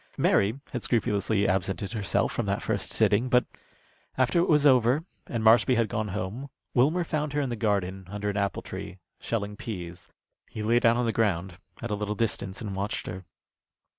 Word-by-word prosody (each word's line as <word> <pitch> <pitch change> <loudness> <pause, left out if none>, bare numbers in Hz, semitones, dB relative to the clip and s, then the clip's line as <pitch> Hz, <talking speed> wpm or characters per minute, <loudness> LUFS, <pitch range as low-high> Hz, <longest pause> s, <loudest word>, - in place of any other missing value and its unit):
Mary 105 +7 +2
had 125 - -3
scrupulously 105 -3 +1
absented 95 +1 -1
herself 105 -4 0
from 120 - -2
that 100 +3 -1
first 100 -3 -1
sitting; 110 +3 +2
but 125 0 +4 0.7
after 130 +6 +3
it 175 - +2
was 150 -2 +4
over 130 +2 +4 0.2
and 115 -3 -3
Marshby 120 +3 +5
had 115 -1 +2
gone 110 +1 -2
home, 105 +7 -4 0.2
Wilmer 155 +8 +3
found 150 -2 -2
her 145 - 0
in 140 -3 -1
the 120 - -2
garden, 95 -4 -1
under 105 +1 -4
an 100 - -1
apple 100 -1 -1
tree, 95 - -7 0.2
shelling 105 -2 -3
pease. 90 -5 -7 0.4
He 110 - -5
lay 115 +3 +3
down 115 0 +4
on 125 - +1
the 115 - 0
ground, 95 -4 0 0.2
at 120 - -3
a - - +1
little 105 0 -3
distance, 100 -3 -2
and 100 -2 -4
watched 100 +3 -3
her. 95 0 -7
110 Hz, 190 wpm, -27 LUFS, 100-120 Hz, 0.7 s, Marshby